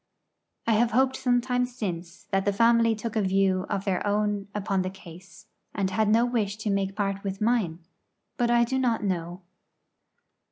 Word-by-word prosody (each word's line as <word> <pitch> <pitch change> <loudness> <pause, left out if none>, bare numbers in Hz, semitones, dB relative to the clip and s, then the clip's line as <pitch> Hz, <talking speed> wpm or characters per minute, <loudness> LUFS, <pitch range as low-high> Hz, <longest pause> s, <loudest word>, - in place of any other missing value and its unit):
I 230 - +2
have 225 +2 +3
hoped 260 +2 +3
sometimes 250 0 0
since 175 -5 -5
that 195 0 +2
the 205 - +1
family 230 +1 +4
took 220 +1 -5
a 220 - +2
view 190 -1 +1
of 200 -2 -2
their 190 -3 0
own 205 -1 0
upon 195 -2 0
the 185 - -2
case, 185 -1 -14 0.3
and 190 -2 0
had 215 +2 +1
no 230 +3 +4
wish 215 -5 -1
to 215 -1 -2
make 195 -1 -1
part 195 -2 -2
with 195 -1 -4
mine; 215 -7 +1 0.6
but 240 -2 +1
I 235 0 +4
do 265 +3 -1
not 235 -4 +1
know. 175 -1 -3
205 Hz, 175 wpm, -26 LUFS, 195-230 Hz, 0.6 s, family